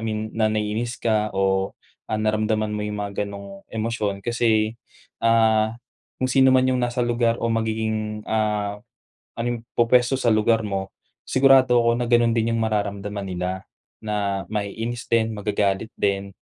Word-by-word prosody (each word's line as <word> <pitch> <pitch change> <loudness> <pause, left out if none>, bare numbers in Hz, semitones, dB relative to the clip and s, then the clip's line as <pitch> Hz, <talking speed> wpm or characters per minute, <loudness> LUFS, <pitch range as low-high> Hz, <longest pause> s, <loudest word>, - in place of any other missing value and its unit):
mean 110 -1 -3
na 110 -1 +1
naiinis 110 +3 -2
ka 110 -2 +1
o, 95 0 +1 0.4
ah, 110 - 0
naramdaman 110 0 0
mo 105 - -3
yung 105 0 -3
mga 100 0 -3
ganong 100 -1 -9
emosyon 110 -3 -3
kasi, 115 -1 +1 0.4
ah, 110 -1 +3 0.4
kung 130 - 0
sino 130 -1 +5
man 130 0 +4
yung 130 -1 +1
nasa 120 0 0
lugar 120 -1 +1
o 115 - -2
magiging, 110 -1 -2
ah 105 -2 -1 0.6
anong 120 0 -2
pupuwesto 120 +2 +4
sa 120 - +1
lugar 110 +1 +3
mo, 95 -1 -3 0.3
sigurado 130 -2 +5
ako 115 0 +3
na 120 - -1
ganon 120 -1 +4
din 115 0 +1
yung 115 - 0
mararamdaman 105 -2 -2
nila 95 0 -4 0.4
na 100 -2 -1
maiinis 115 +3 -4
din, 115 -1 +2
magagalit 105 0 -1
din. 100 -1 -1
110 Hz, 150 wpm, -23 LUFS, 105-115 Hz, 0.6 s, sino